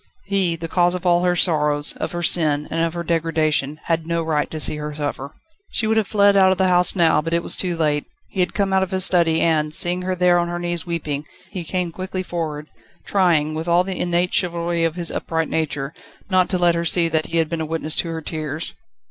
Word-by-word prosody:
He, 195 -4 0
the 165 0 -6
cause 175 +1 +2
of 180 0 -6
all 175 0 +3
her 180 0 +2
sorrows, 150 -4 +2
of - - -3
her 175 0 -3
sin, 150 -4 +2
and 165 - -1
of 165 0 -1
her 170 - -3
degradation, 155 -3 0
had 165 -1 -1
no 170 0 -1
right 155 -2 0
to 155 - -5
see 150 - -1
her 150 0 -5
suffer. 145 -2 -4 0.4
She 225 - -1
would 220 0 +1
have 215 -3 +1
fled 200 -1 +4
out 190 -1 +5
of 190 - +1
the 190 -1 +2
house 180 +1 +3
now, 165 -4 +3
but 165 +2 -2
it 170 - 0
was - - +2
too 180 -3 -1
late. 150 -2 0 0.3
He 195 - -6
had 180 -1 0
come 195 -2 0
out 190 - +3
of 190 - -1
his 190 -1 +1
study, 165 -3 +3
and, 155 -2 +1
seeing 175 +1 +2
her 185 0 -2
there 180 -1 +3
on 175 - 0
her 175 0 -3
knees 175 0 -3
weeping, 150 -3 -3 0.2
he 180 - -4
came 180 +1 -2
quickly 185 +2 -5
forward, 155 -4 -4 0.4
trying, 165 -6 +2
with 160 +2 -4
all 175 +1 +4
the 190 0 -4
innate 175 +1 0
chivalry 170 -2 0
of 165 -1 0
his 175 -1 -1
upright 165 -1 -2
nature, 145 -2 -2 0.4
not 185 -1 +3
to 185 - 0
let 175 -1 +3
her 170 0 -1
see 170 0 +2
that 160 -1 -1
he 170 - -2
had 165 -1 +2
been 165 0 -3
a - - -2
witness 160 -1 -1
to 170 - +1
her 165 0 -4
tears. 155 0 -4
170 Hz, 245 wpm, -21 LUFS, 160-180 Hz, 0.4 s, out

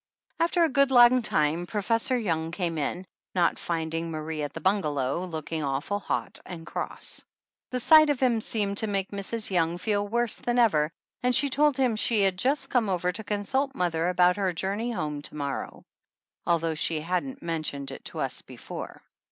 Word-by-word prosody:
After 340 +1 +3
a 325 - +3
good 275 0 +3
long 245 0 +7
time 160 -3 +1
Professor 230 +5 0
Young 165 -8 -1
came 170 -2 -2
in, 175 +6 -2 0.3
not 175 -2 +2
finding 165 0 -2
Marie 155 -1 -4
at 145 -1 -3
the 165 - -7
bungalow, 155 -5 0
looking 160 -2 -4
awful 140 +9 -1
hot - - -2
and 165 -2 -8
cross. - - -4 0.5
The 250 - -1
sight 310 +4 +7
of 285 -3 +1
him 240 -4 +2
seemed 205 -2 0
to 220 - +1
make 195 -2 -1
Mrs. 205 +2 -2
Young 170 -1 +1
feel 205 +2 -1
worse 235 +1 +1
than 240 0 -1
ever 160 -11 +4 0.3
and 250 0 +2
she 280 0 +3
told 290 0 +3
him 255 -4 +2
she 215 0 +2
had 190 -1 +2
just 270 +3 0
come 235 -5 +2
over 180 -1 0
to 210 +4 -6
consult 215 +7 -1
mother 170 -3 0
about 180 0 +4
her 190 -3 0
journey 200 +7 -2
home 155 -9 -3
to - - -6
morrow, 140 -2 -4 0.6
although 165 -1 +2
she 155 0 -1
hadn't 185 - -3
mentioned 155 -4 -3
it - - -9
to - - -5
us - - -2
before. - - -9
190 Hz, 185 wpm, -27 LUFS, 165-240 Hz, 0.6 s, long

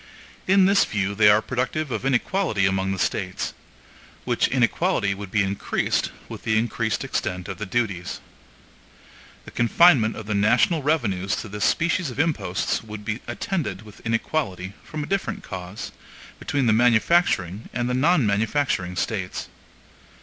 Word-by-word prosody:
In 190 0 +5
this 200 +1 +5
view 100 -1 -1
they 105 0 +5
are 105 +1 +5
productive 130 +4 -2
of - - -3
inequality 130 - +1
among 95 0 +1
the 95 - -2
States; 95 0 -2 0.7
which - - +2
inequality 100 -1 +1
would 100 0 -8
be 105 +1 +2
increased 100 +1 -1 0.2
with - - -8
the 110 -1 +1
increased 110 0 -1
extent 90 0 -3
of - - -6
the 105 - -4
duties. 95 -5 -2 1.3
The - - -10
confinement 120 -1 +4
of 110 - -7
the 105 - -2
national 110 - +3
revenues 100 - 0
to - - -8
this 105 +1 -2
species 170 -1 +1
of 125 - -8
imposts 145 - 0
would 105 -1 -9
be 110 +2 -2
attended 150 - -3
with 105 -2 -14
inequality, 115 -5 -2
from 155 -1 -5
a - - -4
different 195 +4 -2
cause, 95 +2 -7 0.5
between 140 -2 -1
the 110 - +4
manufacturing 115 - +2
and 120 0 -2
the 125 - -1
non 145 +2 +3
manufacturing 105 -3 0
States. 95 0 -3
110 Hz, 150 wpm, -24 LUFS, 100-140 Hz, 1.3 s, In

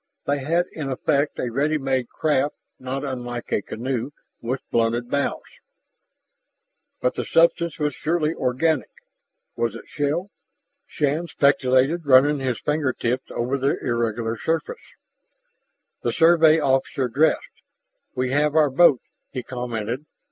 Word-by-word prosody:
They 145 0 0
had, 165 +6 +1
in 150 -4 -5
effect, 140 +2 0
a 120 - -2
ready 145 +5 +1
made 130 -3 -1
craft 145 -2 0 0.2
not 130 +2 -4
unlike 120 -3 -5
a - - +1
canoe 120 +4 -3 0.3
with 125 +3 -4
blunted 120 +1 0
bows. 140 0 -1 1.6
But 125 - +1
the - - -3
substance 170 0 +2
was 150 -2 -1
surely 160 +1 0
organic: 140 +5 0 0.7
Was 115 -2 -1
it - - -10
shell? 155 +7 -2 0.6
Shann 150 +3 -1
speculated, 140 +2 +2
running 140 +2 +5
his 130 -3 -2
finger 150 -3 0
tips 125 +3 -2
over 130 +4 -2
the 135 +2 +1
irregular 115 -1 -2
surface. 165 - -2 1.2
The - - 0
Survey 165 -1 +5
officer 135 -2 +1
dressed. 145 +7 0 0.5
"We 130 0 -1
have 150 +2 +2
our 150 -3 +4
boat," 140 -2 +5 0.3
he 130 -2 -5
commented. 120 +2 -4
135 Hz, 130 wpm, -23 LUFS, 125-155 Hz, 1.6 s, running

